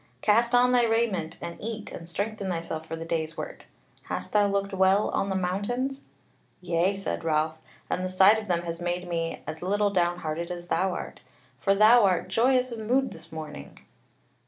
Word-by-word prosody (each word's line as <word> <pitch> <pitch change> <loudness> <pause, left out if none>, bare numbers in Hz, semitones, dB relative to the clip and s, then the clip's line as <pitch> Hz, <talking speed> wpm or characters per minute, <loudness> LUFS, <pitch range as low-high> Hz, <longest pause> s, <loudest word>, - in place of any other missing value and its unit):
Cast 235 +3 +3
on 250 +1 +5
thy 245 -1 +4
raiment, 225 -8 0
and 170 - -6
eat 220 0 -5
and 165 0 -8
strengthen 200 +2 -3
thyself 165 -2 -4
for 165 - -4
the 165 0 -6
day's 165 -1 -2
work. - - -7 0.4
Hast - - -5
thou 205 -1 +4
looked 200 0 -1
well 190 +2 +3
on 195 - 0
the 190 - -1
mountains?" 245 +9 -2 0.6
"Yea," 175 +2 +1
said 195 -3 -4
Ralph, 155 0 0 0.3
"and 185 - -2
the 185 - -2
sight 190 +4 +6
of 215 - -8
them 175 -2 0
has 170 0 -5
made 175 +1 -2
me 165 -1 -3
as 155 +1 -6
little 205 +3 +1
downhearted 175 -3 -1
as 175 -1 -7
thou 190 -1 +1
art. - - -7 0.4
For 195 +8 +2
thou 220 +3 +7
art 185 -2 +2
joyous 250 +5 +2
of 230 - -5
mood 255 +5 +1
this - - -9
morning." 160 -1 -8
190 Hz, 185 wpm, -27 LUFS, 170-215 Hz, 0.6 s, thou